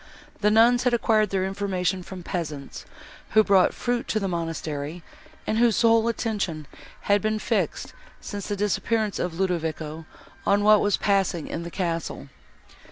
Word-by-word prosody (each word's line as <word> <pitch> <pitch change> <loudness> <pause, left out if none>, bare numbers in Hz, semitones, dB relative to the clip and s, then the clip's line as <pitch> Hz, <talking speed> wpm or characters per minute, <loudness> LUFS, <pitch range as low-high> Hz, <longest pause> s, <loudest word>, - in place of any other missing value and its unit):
The 210 - +3
nuns 235 +3 +5
had 250 -1 +2
acquired 215 -3 +2
their 190 -1 0
information 190 -2 -1
from 180 0 -9
peasants, 155 -6 -5 0.5
who 215 0 +6
brought 195 -3 +4
fruit 245 -1 -2
to 215 - 0
the 195 - -2
monastery, 165 -2 -4 0.4
and 220 - 0
whose 235 -1 +3
whole 230 0 +4
attention 205 -9 -2 0.4
had 205 0 +2
been 215 +1 0
fixed, - - -2 0.3
since 205 -2 -6
the 205 - -2
disappearance 210 +1 0
of 175 -1 -3
Ludovico, 160 -3 -2 0.4
on 205 +1 +2
what 210 0 +6
was 205 - +2
passing 195 -5 +1
in 165 - -4
the 170 - -6
castle. 165 -6 -3
195 Hz, 155 wpm, -25 LUFS, 170-215 Hz, 0.5 s, who